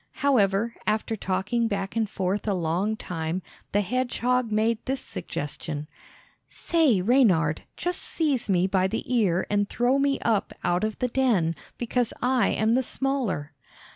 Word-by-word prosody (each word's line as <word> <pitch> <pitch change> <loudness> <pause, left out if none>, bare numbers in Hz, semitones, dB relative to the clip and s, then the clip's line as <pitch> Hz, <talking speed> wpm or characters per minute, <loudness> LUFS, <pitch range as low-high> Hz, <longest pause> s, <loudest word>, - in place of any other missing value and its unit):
However, 220 -4 +3
after 215 +1 0
talking 205 +4 0
back 195 -2 -3
and 220 -2 0
forth 195 +3 -2
a 200 - +2
long 180 +6 0
time, 165 0 -3 0.3
the 205 - +2
hedgehog 250 +1 0
made 220 +1 +1
this 265 +1 0
suggestion: 150 - -5 0.6
"Say, 300 - +2
Reynard, 185 - +3
just 355 0 -1
seize 285 -9 0
me 180 -2 +3
by 190 -1 +2
the 220 +4 -3
ear 190 -6 +2
and 205 -1 0
throw 245 +3 +2
me 275 0 +2
up 220 -3 0
out 175 +2 +1
of 215 -1 -1
the 250 - 0
den, 230 -11 +1 0.2
because 240 0 -1
I 250 -1 +2
am 220 +2 +2
the 255 - +3
smaller." 245 - -2
215 Hz, 150 wpm, -26 LUFS, 185-250 Hz, 0.6 s, However